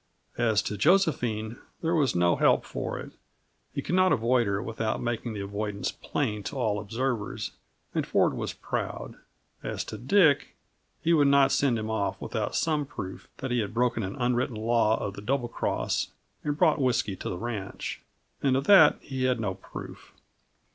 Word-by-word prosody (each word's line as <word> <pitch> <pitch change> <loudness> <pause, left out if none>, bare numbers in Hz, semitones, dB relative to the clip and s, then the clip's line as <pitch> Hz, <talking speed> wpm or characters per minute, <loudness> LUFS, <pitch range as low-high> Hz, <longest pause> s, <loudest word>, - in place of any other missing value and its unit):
As 110 -3 +3
to 105 - -3
Josephine, 120 - +2 0.3
there 165 +1 +1
was 145 - +2
no 85 0 +4
help - - +3
for - - -4
it; - - -8 0.6
he - - -4
could - - -3
not 185 0 +4
avoid 120 0 +3
her 100 0 0
without 110 0 -2
making 120 -1 -2
the 105 - -4
avoidance 100 +1 -3
plain 105 -7 -2
to - - -4
all 110 -6 0
observers, 115 +1 -2 0.4
and - - +1
Ford - - +2
was - - -3
proud. - - -4 0.5
As - - -3
to - - -7
Dick, 155 +1 +3 0.5
he 170 - +3
would 145 -3 +5
not 140 -1 +5
send 135 -4 +2
him 110 0 -3
off 105 -2 -1
without - - -3
some 155 -2 +1
proof 95 -9 -7
that 130 -1 -4
he 120 - +2
had 110 0 -3
broken 120 -1 +1
an 95 -1 -4
unwritten 125 0 0
law 110 0 +2
of 100 - -3
the 100 - -8
Double 125 +3 0
Cross - - -1 0.4
and 145 -1 -1
brought 155 -3 +3
whisky 120 -6 +1
to - - -5
the 90 - -3
ranch; 110 -3 -5 0.4
and 135 -2 +3
of 135 - 0
that 185 -3 +7
he 130 -2 -3
had 125 -2 +2
no 100 -4 -1
proof. 95 - -10
120 Hz, 180 wpm, -28 LUFS, 105-140 Hz, 0.6 s, that